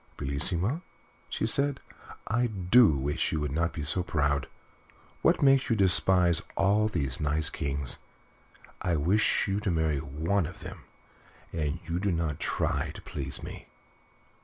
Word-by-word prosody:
"Bellissima," 85 - 0 0.5
she - - -2
said, 140 +4 +1 0.5
"I 120 +2 +1
do 100 - +4
wish 70 +2 -1
you 80 - -1
would 75 -2 -2
not 80 +3 0
be 75 - -5
so 80 +5 0
proud. 70 -5 0 0.7
What - - +3
makes 135 -1 +4
you 115 - +3
despise 90 -3 +4 0.2
all 100 +3 +3
these 70 -10 -2
nice 75 +1 0
kings? 70 -2 -1 0.8
I 90 -2 0
wish 90 +9 +2
you 100 +1 0
to 105 -1 -2
marry 80 -4 +1
one 80 +6 -1
of 85 - -11
them, - - -9 0.7
and 75 -3 -2
you 85 +2 -1
do 100 +1 0
not 80 -4 -2
try - - -1
to - - -9
please - - -5
me." - - -9
85 Hz, 150 wpm, -28 LUFS, 75-100 Hz, 0.8 s, do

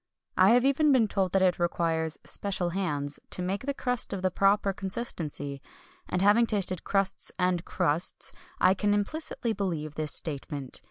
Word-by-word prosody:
I 185 +1 +5
have 245 +1 +3
even 285 +2 +3
been 245 -5 +4
told 195 -3 -1
that 195 -1 +3
it 180 -1 +2
requires 165 -2 0
"special 185 -3 -3
hands" 145 -6 -2
to 180 - -1
make 195 +8 -3
the 280 - 0
crust 250 -5 +2
of 190 -2 -4
the 185 - +2
proper 195 +1 +2
consistency; 165 - -4 0.5
and 180 +1 0
having 220 +4 +5
tasted 190 -5 +1
crusts 195 -1 -1
and 180 -2 +1
crusts, 155 +4 -1 0.3
I 185 - +5
can 205 +1 +1
implicitly 235 +1 -2
believe 165 -7 -3
this 155 -1 0
statement. 140 -3 -2
190 Hz, 165 wpm, -28 LUFS, 165-205 Hz, 0.5 s, I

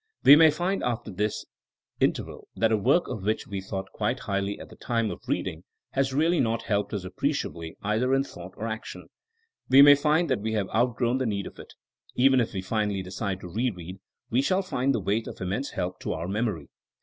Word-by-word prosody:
We 140 - +10
may 160 +1 +7
find 175 +6 -1
after 120 -2 -2
this 105 +3 -2 0.5
in - - +4
terval - - -9
that 115 0 +2
a - - +4
work 135 - +2
of 105 - -5
which 110 +3 -1
we 100 -1 -5
thought 95 0 -5
quite - - -1
highly 100 0 -2
at - - -10
the - - -13
time 115 -3 -1
of - - -8
reading - - -2 0.3
has 135 0 0
really 160 +5 +2
not 115 -2 0
helped 105 -1 -1
us 100 -4 -3
appreciably 90 - -3
either 110 +5 +1
in 135 - +2
thought 90 -8 -11
or 110 - -3
ao 110 - -1
^ - - -21
tion. - - -10 0.6
We 135 +2 +9
may 145 0 +10
find 150 +4 +2
that 125 - +1
we 110 +1 -2
have 100 -3 -1
outgrown 120 +2 +1
the 130 - 0
need 100 -2 -2
of - - -10
it. - - -12 0.4
Even 130 +1 +5
if 115 - -2
we 95 -1 -3
finally 105 -1 -1
decide 95 +1 -4
to - - -7
re 115 +9 0
read 90 -1 -9 0.3
we 125 +3 +3
shall 185 +7 +1
find 135 -7 0
the - - 0
wait 105 +3 -1
of - - -8
immense 100 +9 -2
help 90 +1 -4
to - - -3
our 80 +2 -4
memory. 100 - -2
110 Hz, 225 wpm, -27 LUFS, 100-130 Hz, 0.6 s, We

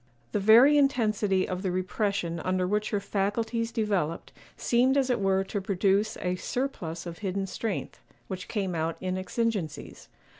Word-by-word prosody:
The - - 0
very 240 +9 +7
intensity 215 -8 +2
of 185 -1 -3
the 190 - -1
repression 185 -2 -1
under 185 +1 0
which 210 +3 0
her 205 - 0
faculties 225 +4 -1
developed 200 -8 -1 0.2
seemed 255 +3 +3
as 265 -2 +2
it 245 - +1
were 195 0 +2
to 200 +1 -4
produce 195 +2 +1
a 180 0 -1
surplus 180 -11 -3
of 170 -1 -7
hidden 195 -1 -2
strength, 200 +1 -4 0.3
which 185 -1 -6
came 195 -5 -2
out 165 0 -1
in 185 0 -2
exigencies. 190 -4 -3
200 Hz, 155 wpm, -28 LUFS, 185-225 Hz, 0.3 s, very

